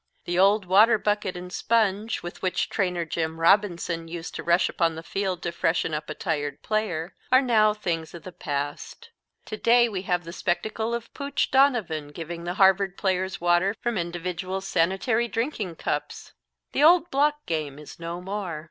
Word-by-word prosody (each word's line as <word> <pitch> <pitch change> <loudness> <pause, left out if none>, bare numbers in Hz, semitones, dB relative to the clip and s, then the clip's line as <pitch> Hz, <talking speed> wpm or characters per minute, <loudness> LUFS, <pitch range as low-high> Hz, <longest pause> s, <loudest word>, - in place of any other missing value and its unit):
The 175 +1 -1
old 200 +1 +4
water 210 +5 +6
bucket 205 -3 -1
and 180 +1 -8
sponge, 220 -1 0
with 175 - -8
which 185 -1 -1
Trainer 180 -4 0
Jim 160 0 -3
Robinson 170 -2 +2
used 165 0 -7
to - - -5
rush 170 +1 +3
upon 165 -2 0
the 160 - -7
field 190 -1 -3
to 170 - -2
freshen 165 -1 0
up 150 0 -4
a - - -4
tired 145 -5 -3
player, 190 -6 -2 0.2
are 255 - +7
now 225 -5 +4
things 170 -6 -3
of 170 - -10
the 185 - -8
past. 145 - -5 0.3
To 215 - -6
day 240 +2 +4
we 200 -5 -4
have 180 -2 -1
the 170 +1 -8
spectacle 220 +6 -2
of 235 -1 -7
Pooch 280 0 -2
Donovan 230 - +2
giving 165 +3 -7
the 175 +1 -3
Harvard 195 0 +3
players 190 -1 -1
water 175 +4 +2
from 240 -1 -2
individual 180 +1 -3
sanitary 195 +6 +1
drinking 225 - -3
cups! - - -4 0.4
The - - 0
old 345 +2 +6
block 295 +2 +1
game 155 -4 -3
is 150 +2 -12
no 170 +1 -5
more. 190 -4 -4
185 Hz, 175 wpm, -25 LUFS, 170-215 Hz, 0.4 s, are